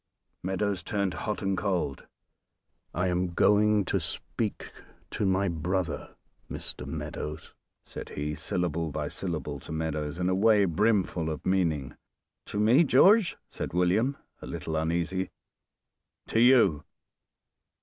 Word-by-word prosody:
Meadows 95 +1 -1
turned 100 -4 -1
hot 105 -1 -3
and 95 0 +1
cold. 90 -9 -2 0.8
"I 90 +2 0
am 90 -1 -1
going 105 0 +4
to - - 0
speak - - -4 0.4
to 105 - 0
my 95 +1 +2
brother, 85 -1 -2 0.3
Mr. - - -5
Meadows!" 75 +1 -6 0.3
said - - -8
he, 75 +1 -2
syllable 85 0 -2
by 70 - -3
syllable 75 -6 -4
to - - -10
Meadows 80 -1 -2
in 90 0 0
a 95 - +2
way 105 +1 +4
brimful 90 -2 +1
of 80 - -5
meaning. 80 -8 0 0.5
"To 105 - -3
me, 115 +9 +5
George?" 190 - +5
said - - -5
William, 100 +10 +2 0.2
a - - -8
little 80 - -4
uneasy. 85 +4 -1 1.0
"To 115 - +2
you! 115 - +5
90 Hz, 130 wpm, -28 LUFS, 80-105 Hz, 1.0 s, me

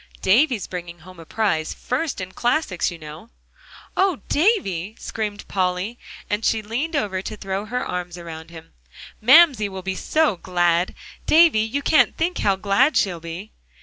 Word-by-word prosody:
"Davie's 230 +3 +3
bringing 175 -2 -7
home 185 +1 -14
a 165 - -12
prize; 175 -8 -1
first 270 +2 -3
in 185 0 -6
classics, 240 - 0
you 175 - -8
know." 155 +7 -11 0.7
"Oh, 375 -6 +1
Davie!" 220 - +1
screamed 210 -2 -5
Polly, 185 +4 -1 0.3
and 210 +2 -2
she 220 -1 +1
leaned 260 +10 -3
over 200 -8 -1
to 210 - -7
throw 195 +1 -4
her 250 +4 -3
arms 180 -1 -5
around 165 -2 -9
him; 165 -1 -13 0.5
"Mamsie 255 -3 +6
will 190 -1 -7
be 190 0 -2
so 305 - +1
glad. 175 0 +1 0.3
Davie, 320 -7 +6
you 225 +6 -1
can't 310 - +3
think 345 +3 -1
how 200 -1 +2
glad 205 +10 +2
she'll 180 -4 +1
be!" 170 +5 -8
200 Hz, 160 wpm, -22 LUFS, 180-250 Hz, 0.7 s, Mamsie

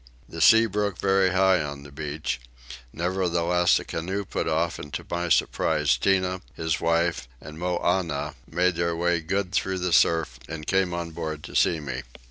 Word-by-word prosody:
The 80 - -7
sea 115 +8 +7
broke 105 -2 -1
very 95 -1 +3
high 95 -1 +3
on 70 -1 -6
the 70 - -12
beach; 75 -2 -4 0.5
nevertheless 90 0 +1
a - - -4
canoe 95 +5 -3
put - - -3
off 80 +1 0
and 75 - -9
to - - -5
my 85 0 -1
surprise 75 -3 +2
Tinah, 95 +5 +1
his 80 0 -1
wife, 85 -4 +1
and 75 +3 -10
Moannah 85 -4 -1 0.2
made 90 +2 +2
their 85 -1 0
way 85 0 +1
good 95 +3 -2
through 95 -1 0
the 90 -1 -1
surf 80 -8 +3
and 80 -1 -6
came 95 +1 +1
on 85 -1 -4
board 80 -2 -5
to - - -9
see 80 - +3
me. 65 -4 -5
85 Hz, 175 wpm, -25 LUFS, 80-95 Hz, 0.5 s, sea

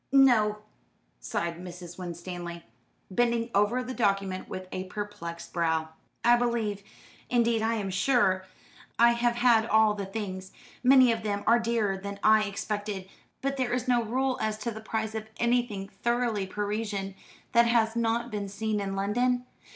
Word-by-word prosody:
"No," 240 -6 +5 0.6
sighed 170 0 -3
Mrs. 180 0 -9
Winstanley, 175 -1 -6 0.5
bending 235 +2 +1
over 210 +6 +2
the 255 +1 -5
document 195 -5 0
with 185 0 -6
a 185 - -4
perplexed 185 -4 -6
brow, 160 -2 0 0.3
"I 240 0 +6
believe 230 -4 -1 0.5
indeed, 235 -2 +2
I 225 +1 +1
am 200 -3 -3
sure 190 -2 +2 0.5
I 235 0 +6
have 235 0 +1
had 235 -2 +4
all 220 -1 +4
the 200 -2 -5
things. 190 -2 -5 0.3
Many 255 -1 +7
of 225 -1 -1
them 205 -1 -2
are 235 +2 +5
dearer 225 -4 0
than 200 +1 -7
I 215 0 +5
expected; 205 -1 -4 0.4
but 275 0 -1
there 250 -2 0
is 250 -1 -1
no 245 -1 +3
rule 255 +3 -1
as 215 -1 -1
to 235 - -1
the 220 0 -8
price 220 0 -3
of 220 0 -5
anything 235 -5 0
thoroughly 225 0 -1
Parisian, 205 -1 -3 0.4
that 235 0 +5
has 230 -1 +2
not 235 +1 0
been 205 -2 -3
seen 215 +1 -2
in 195 -1 -3
London. 245 +6 +1
215 Hz, 160 wpm, -28 LUFS, 195-235 Hz, 0.6 s, Many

